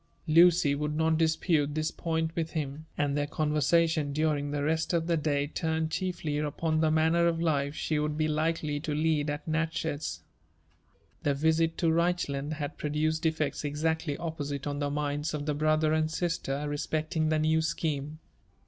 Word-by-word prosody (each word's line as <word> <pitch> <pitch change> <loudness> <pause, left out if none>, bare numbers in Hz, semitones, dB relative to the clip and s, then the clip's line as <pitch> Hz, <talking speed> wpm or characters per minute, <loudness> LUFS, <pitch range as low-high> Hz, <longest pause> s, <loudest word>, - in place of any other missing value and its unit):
Lucy 165 -1 +5
would 150 +1 -2
not 160 +1 +2
dispute 160 -2 +1
this 155 0 0
point 160 -1 -2
with 165 -1 -2
him; 150 0 -4
and 145 -1 0
their 145 0 0
conversa 155 +2 +2
tion 155 -3 -1
during 150 -1 0
the 145 0 -2
rest 160 +3 0
of 165 -1 +1
the 170 0 +1
day 145 -2 0
turned 160 +1 -2
chiefly 170 -6 -2
upon 155 +2 -1
the 160 0 +3
manner 160 +2 +3
of 165 -1 0
life 145 -3 0
she 155 -1 -1
would 150 0 -1
be 155 0 +1
likely 155 -1 0
to 150 0 -3
lead 155 -1 +1
at 145 +2 -4
Natchez. 160 -1 -2 1.0
The 145 -1 +1
visit 160 +2 +2
to 165 -3 +2
Reichland 160 -4 0
had 145 -2 -5
produced 155 +2 0
effects 155 -3 -1
exactly 150 0 -1
opposite 145 -4 -4
on 145 -1 -3
the 145 -1 0
minds 150 +2 -2
of 145 -1 -4
the 150 - 0
brother 155 +1 +2
and 155 0 +1
sister 155 -4 -2
respecting 155 +2 -1
the 155 - +2
new 155 +1 +2
scheme. 155 -2 -2
155 Hz, 175 wpm, -29 LUFS, 145-160 Hz, 1.0 s, Lucy